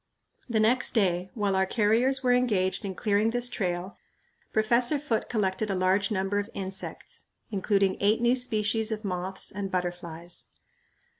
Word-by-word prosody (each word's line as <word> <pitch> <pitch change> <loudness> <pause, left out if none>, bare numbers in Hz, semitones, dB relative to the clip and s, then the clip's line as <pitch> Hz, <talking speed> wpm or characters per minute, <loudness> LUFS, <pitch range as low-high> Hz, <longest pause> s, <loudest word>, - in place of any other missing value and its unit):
The 225 -2 +1
next 245 +4 +2
day, 185 -4 +1
while 205 -3 0
our 190 0 +2
carriers 240 +6 +2
were 250 - +3
engaged 210 -7 +1
in 195 -2 -4
clearing 210 +1 +1
this 245 +1 0
trail, 180 -4 -3 0.5
Professor 235 +6 +3
Foote 275 -6 -2
collected 210 -1 0
a 195 - 0
large 185 +2 +2
number 195 0 0
of 205 +2 -4
insects, 190 -1 -5 0.3
including 195 -1 +1
eight 210 +3 +3
new 240 +1 +3
species 220 -2 0
of 215 0 -4
moths 185 0 -2
and 195 0 -4
butterflies. 175 -2 -4
205 Hz, 150 wpm, -27 LUFS, 190-225 Hz, 0.5 s, were